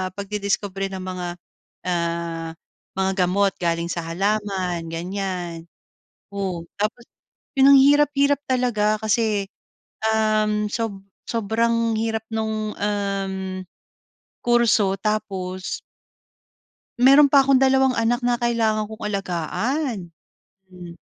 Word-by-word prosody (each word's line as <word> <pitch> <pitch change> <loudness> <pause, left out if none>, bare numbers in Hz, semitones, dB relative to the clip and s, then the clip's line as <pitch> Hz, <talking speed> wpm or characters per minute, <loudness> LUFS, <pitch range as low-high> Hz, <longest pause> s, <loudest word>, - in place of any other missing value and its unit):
pagdidiskubre 200 -1 -2
ng 190 -1 -5
mga, 185 -1 -4 0.6
ah, 170 -1 -2 0.5
mga 190 0 +1 0.2
gamot 195 +1 +2
galing 170 0 0
sa 170 -1 -3
halaman, 190 0 -1
ganiyan, 175 -1 -4 0.7
oh. 185 -4 -3 0.2
Tapos, 230 +3 -2 0.5
‘yon 270 +1 +7
ang 275 - +9
hirap-hirap 285 0 +4
talaga 225 -5 +1
kasi, 215 -2 +1 0.7
um, 215 -1 +1
sob 225 -4 -3 0.3
sobrang 230 +1 +1
hirap 220 0 -2
nung, 220 -1 -2
um, 195 -2 -2 0.8
kurso 225 -5 +3
tapos 190 -4 -3 1.2
Mayro'n 280 +2 +8
pa 275 -1 +5
akong 270 -1 +4
dalawang 265 0 +4
anak 240 +1 0
na 245 0 +1
kailangan 220 -3 +1
kong 220 0 -8
alagaan. 200 - -2 0.6
Hmm. 175 -2 -11
210 Hz, 100 wpm, -23 LUFS, 185-230 Hz, 1.2 s, ang